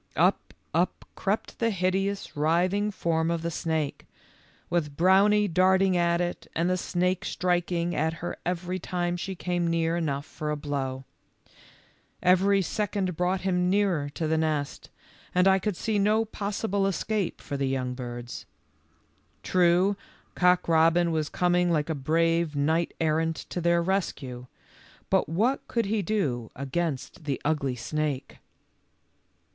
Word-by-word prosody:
Up, - - +1 0.2
up - - 0
crept - - -2
the 230 - +2
hideous 195 +1 -1
writhing 180 +7 +2
form 165 -4 0
of 170 -1 -1
the 170 - -2
snake, 160 -3 -2 0.6
with 150 -5 -1
Brownie 200 +4 +5
darting 185 +1 +3
at 170 -1 +2
it 175 0 -3
and 165 +2 +1
the 185 - +2
snake 180 0 0
striking 175 -1 0
at 160 +2 +1
her 165 +1 -5
every 180 +1 -2
time 175 0 -2
she 190 +2 -4
came 175 -1 -1
near 165 0 +1
enough 145 -4 -2
for 150 - -5
a 150 - -1
blow. 135 -2 -3 1.2
Every 190 +2 +4
second 195 -2 -2
brought 180 +2 0
him 180 -1 +1
nearer 185 -7 +1
to 165 - -2
the 160 0 +1
nest, 155 -3 -2 0.5
and 180 +1 +5
I 190 0 +5
could 195 -1 -2
see 215 -2 0
no 215 +2 +3
possible 200 -1 -1
escape 200 0 -1
for 145 - -6
the 135 -1 0
young 130 -1 -1
birds. 120 -1 -7 1.0
True, 180 +2 +3 0.4
Cock 180 0 +3
robin 165 +1 +4
was 155 -2 -1
coming 180 0 +2
like 155 -1 +1
a - - +1
brave 165 +2 +1
knight 160 +4 +1
errant 160 0 +1 0.2
to 175 - -2
their 170 0 +3
rescue, 135 -10 -2 0.6
but - - +2
what 225 +12 0
could 230 -2 0
he 210 +1 0
do 145 - -1
against 140 +2 -3
the 140 -3 -1
ugly 140 -4 0
snake? 145 +2 -3
170 Hz, 145 wpm, -27 LUFS, 155-185 Hz, 1.2 s, Brownie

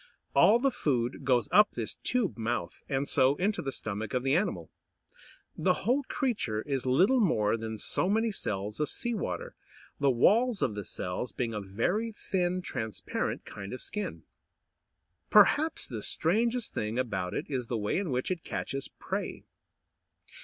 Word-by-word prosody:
All 220 - +6
the 270 +2 +2
food 125 - -1
goes 125 -4 +2
up 210 0 +6
this 115 -3 -4
tube 245 -6 0
mouth, 115 -5 -3
and 135 0 0
so 130 +2 +4
into 200 +6 0
the 135 - -3
stomach 110 -1 -4
of 125 - 0
the 135 0 +2
animal. 195 +5 -1 0.8
The - - +2
whole 260 +4 +3
creature 205 - -1
is 135 -3 -2
little 185 - +4
more 110 - +3
than 110 -1 -5
so 175 - +1
many 220 +2 +2
cells 105 - -3
of 150 - 0
sea 240 -1 -2
water, 90 - -3 0.5
the 140 - +3
walls 210 - +3
of - - +1
the 105 -2 -5
cells 90 +7 -4
being 120 -2 -2
a 105 - -3
very 115 - -1
thin, 185 -3 -1
transparent 110 -9 -3
kind 100 +1 -7
of 125 - -5
skin. 210 -1 -4 1.1
Perhaps 315 +2 +5
the 115 -4 -5
strangest 230 - +1
thing 110 +2 -2
about 100 -8 -2
it - - -2
is 130 -4 -3
the 120 - -1
way 105 - 0
in 195 -4 -2
which 130 +5 -1
it 175 -3 -3
catches 135 0 -4
prey. - - -5
135 Hz, 165 wpm, -30 LUFS, -, 1.1 s, All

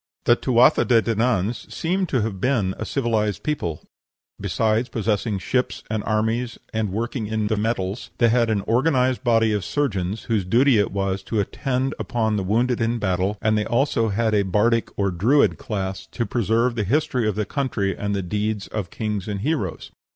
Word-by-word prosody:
The 120 - +5
Tuatha 125 0 +4
de 120 -2 +4
Dananns 115 -1 0
seem 185 +3 -1
to 130 -8 0
have 100 -4 -4
been 115 -8 +1
a - - -3
civilized 110 -6 -1
people; 90 - -2 0.6
besides 110 +2 0
possessing 110 -2 -1
ships 125 +6 -1
and 110 -2 -1
armies 110 +2 0 0.2
and 110 -3 -1
working 115 +2 -3
in 110 0 -1
the 110 +1 +1
metals, 105 -1 -2
they 120 - +4
had 115 0 +2
an 105 -2 +1
organized 130 +2 +1
body 115 -3 +3
of 105 -2 -1
surgeons, 100 -4 -1
whose 110 -4 0
duty 120 +5 +4
it 100 - +1
was 95 -1 -1
to 105 +3 -2
attend 130 +6 -1
upon 110 -4 0
the 100 - -1
wounded 120 +5 +1
in 115 +1 +1
battle; 95 0 0
and 110 -1 +3
they 105 - +2
had - - -3
also 120 -2 +1
a 110 0 +2
bardic 105 +4 +1
or 100 -1 +1
Druid 115 +12 +3
class, 95 -3 -4
to 120 - -3
preserve 115 +2 +1
the 115 -3 -1
history 125 0 +1
of 105 - 0
the 105 0 -1
country 105 -6 -1
and 100 0 -2
the 100 - -2
deeds 105 +2 -2
of 105 -5 -4
kings 105 -1 -3
and 100 -2 -3
heroes. 130 - -2
110 Hz, 185 wpm, -23 LUFS, 100-120 Hz, 0.6 s, The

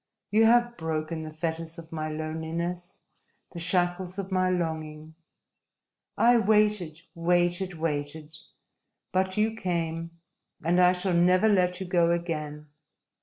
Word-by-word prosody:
You 220 +2 +5
have 240 +1 +3
broken 160 0 -3
the 155 0 -7
fetters 160 +1 -4
of 165 -1 -11
my 155 -1 -3
loneliness, 160 +3 -4 0.5
the 170 - -7
shackles 180 +1 0
of 195 -1 -5
my 185 -1 +2
longing! 160 -3 -3 1.0
I 240 +1 +5
waited, 210 -7 +2
waited, 175 +2 +1
waited 155 -1 -4 0.8
but 190 +1 0
you 220 +1 +1
came, 170 -3 -3 0.5
and 175 +2 +3
I 180 0 +6
shall 180 0 -1
never 180 +4 +4
let 180 -3 +2
you 190 - -4
go 175 -2 +2
again! 155 -3 -3
175 Hz, 125 wpm, -27 LUFS, 160-185 Hz, 1.0 s, I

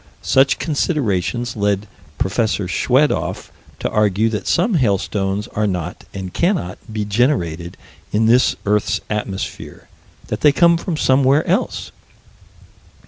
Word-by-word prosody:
Such 135 +1 +3
considerations 120 - -1
led 100 -1 0 0.3
Prof. 110 +4 0 0.2
Schwedoff 130 +10 0 0.3
to - - -2
argue 105 +1 +2
that 105 -3 -4
some 195 +6 +2
hailstones 100 - 0
are 105 0 -1
not, 90 -3 -4
and 95 -2 -7
cannot, 170 - 0
be 105 -1 -2
generated 100 - 0 0.3
in 110 +2 +2
this 120 +3 +4
earth's 105 0 +1
atmosphere 105 -2 -5 0.4
that - - -3
they 150 - +6
come 170 +3 +4
from 165 -1 -3
somewhere 135 +2 +3
else. 190 +9 -1
110 Hz, 120 wpm, -19 LUFS, 100-140 Hz, 0.4 s, they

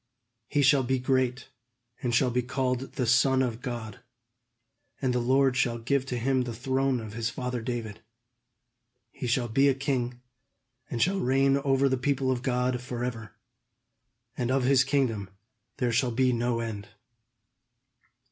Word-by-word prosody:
He 145 - +1
shall 135 0 +5
be 130 +1 0
great, 130 0 0 0.5
and 125 - -1
shall 125 +1 +3
be 125 +1 +1
called 130 +1 -2
the 125 - -1
Son 130 +3 +4
of 120 -1 -3
God; 115 -5 -6 1.0
and 130 -2 0
the 125 - +1
Lord 130 +2 +3
shall 125 -3 +1
give 135 +3 -1
to 125 - -2
him 130 +2 +1
the 120 -2 -4
throne 130 +1 0
of 110 -2 -8
his 115 +1 -2
father 125 0 -4
David. 110 -3 -5 1.1
He 125 - -5
shall 120 +1 +1
be 135 +5 +3
a 135 - +3
king, 125 -3 -2 0.7
and 120 -2 +1
shall 195 +2 +1
reign 135 0 +3
over 140 -1 +2
the 130 -1 +1
people 130 0 0
of 125 -2 -1
God 125 -1 0
forever; 120 -3 -5 1.0
and 125 -2 -2
of 130 0 +2
his 130 0 +4
kingdom 125 -8 0 0.5
there 125 -2 0
shall 120 +2 +2
be 125 +2 +2
no 120 0 0
end." 105 -3 -5
125 Hz, 155 wpm, -28 LUFS, 120-135 Hz, 1.1 s, shall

